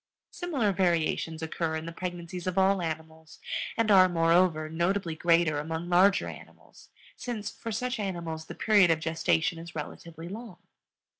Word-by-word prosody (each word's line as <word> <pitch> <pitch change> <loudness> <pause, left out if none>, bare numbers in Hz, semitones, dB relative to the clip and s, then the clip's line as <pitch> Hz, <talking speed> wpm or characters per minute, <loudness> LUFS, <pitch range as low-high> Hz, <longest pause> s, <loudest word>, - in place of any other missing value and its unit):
Similar 280 - -1
variations 165 -3 0
occur 160 0 -2
in 160 0 -4
the 165 - -5
pregnancies 175 0 -6
of 185 0 -2
all 190 0 +3
animals, 160 -1 -6 0.4
and 225 -2 +2
are, 185 -2 +7
moreover, 165 -1 +3
notably 170 +2 -1
greater 165 -2 +3
among 160 +3 -4
larger 190 +3 +4
animals, - - -13 0.3
since 225 -4 -5
for 230 - -7
such 250 +3 -2
animals 170 -5 -4
the - - -8
period 205 -5 +4
of 165 -1 +3
gestation 160 +1 0
is 165 -1 -10
relatively 165 +2 -7
long. 210 0 -8
170 Hz, 150 wpm, -28 LUFS, 160-195 Hz, 0.4 s, are